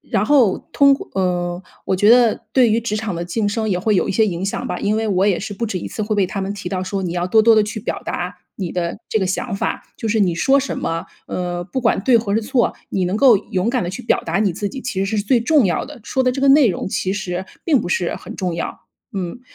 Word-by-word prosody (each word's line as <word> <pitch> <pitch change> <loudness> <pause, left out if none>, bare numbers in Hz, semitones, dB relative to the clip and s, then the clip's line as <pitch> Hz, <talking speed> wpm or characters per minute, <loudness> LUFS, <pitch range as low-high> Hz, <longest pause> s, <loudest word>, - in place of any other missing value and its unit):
然 200 - 0
后 250 -8 +4
通 280 -1 +5
过 - - -8
呃， 180 -1 -1 0.2
我 190 - +1
觉 205 +3 +3
得 240 -2 +5
对 250 -4 +4
于 225 - +2
职 215 -2 -2
场 215 -3 -3
的 170 +1 -3
晋 205 +4 -1
升 220 +1 -1
也 180 - +1
会 210 +4 +1
有 - - +1
一 - - 0
些 220 +3 +3
影 180 -2 -3
响 195 - -3
吧。 180 - -3
因 210 +2 +1
为 220 - -1
我 190 0 +2
也 195 -4 +2
是 205 - -5
不 230 +4 -2
止 195 -4 -3
一 - - -6
次 215 - -4
会 215 +1 -1
被 200 -2 +3
他 195 - -4
们 195 +1 -2
提 200 - -6
到 185 -1 -2
说 195 +1 -3
你 175 -2 -2
要 175 0 -1
多 220 +4 +4
多 225 +1 +6
地 215 - +5
去 210 +1 -4
表 - - -4
达 180 +1 -4 0.2
你 185 -4 -4
的 175 +2 -2
这 - - +1
个 190 - 0
想 200 +4 -2
法。 - - -2
就 - - -5
是 220 0 +1
你 180 -4 +2
说 270 +10 +3
什 275 - -4
么， 165 +3 -3 0.2
呃， 175 -1 -3
不 200 +9 -3
管 230 -2 +2
对 245 0 +5
或 205 -2 -2
是 225 - +1
错， 240 +1 +1 0.2
你 190 - 0
能 185 +3 -1
够 245 -2 +6
勇 205 +1 -2
敢 250 -3 0
地 175 - -3
去 225 +7 -7
表 235 - +1
达 165 +3 -1
你 205 -4 +2
自 205 +4 -3
己 265 - -7
其 200 -7 -2
实 200 +3 -2
是 205 - +1
最 240 +2 +3
重 280 +3 +3
要 175 - 0
的， - - -11
说 260 +2 0
的 255 - +2
这 270 - -4
个 275 - +3
内 275 -2 +6
容 190 - -2
其 190 0 -1
实 190 -2 -4 0.2
并 295 -7 +3
不 - - -4
是 175 -1 0
很 - - -10
重 180 -3 -2
要， 170 - -5 0.3
嗯。 190 +3 -4
205 Hz, 305 characters per minute, -20 LUFS, 185-230 Hz, 0.3 s, 多